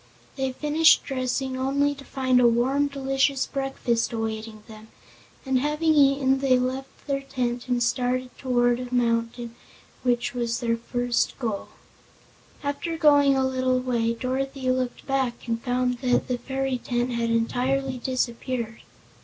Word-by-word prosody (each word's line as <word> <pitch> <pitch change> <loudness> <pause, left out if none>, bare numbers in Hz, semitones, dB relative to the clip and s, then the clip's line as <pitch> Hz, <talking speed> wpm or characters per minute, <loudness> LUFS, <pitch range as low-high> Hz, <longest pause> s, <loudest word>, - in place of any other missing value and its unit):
They 265 -1 -1
finished 305 +4 +4
dressing 260 0 -2
only 280 +2 +1
to 275 -1 -12
find 260 -2 +1
a 240 - +6
warm, 260 +5 +2
delicious 270 0 0
breakfast 270 -4 -1
awaiting 220 -1 -4
them, 215 -1 -12 0.6
and 265 -1 +2
having 300 +3 +1
eaten 275 -2 +4
they 265 -2 +3
left 260 +2 -4
the 275 -1 -1
tent 250 -3 -3
and 245 -1 +1
started 250 +1 -1
toward 245 -2 +1
the 250 - -2
mountain 230 0 0 0.5
which 245 -1 0
was 235 -1 -1
their 230 -2 0
first 245 +1 -1
goal. 225 -6 -3 1.0
After 285 +4 -3
going 285 -3 +5
a 265 - +2
little 255 -1 +1
way 235 -2 0
Dorothy 260 +1 -2
looked 255 -1 -2
back 260 -4 -1
and 230 0 -1
found 250 0 0
that 250 -1 +1
the 250 -1 -2
fairy 265 -1 -2
tent 240 +1 -1
had 235 -1 -1
entirely 255 +3 0
disappeared. 240 -2 -3
255 Hz, 145 wpm, -25 LUFS, 240-270 Hz, 1.0 s, a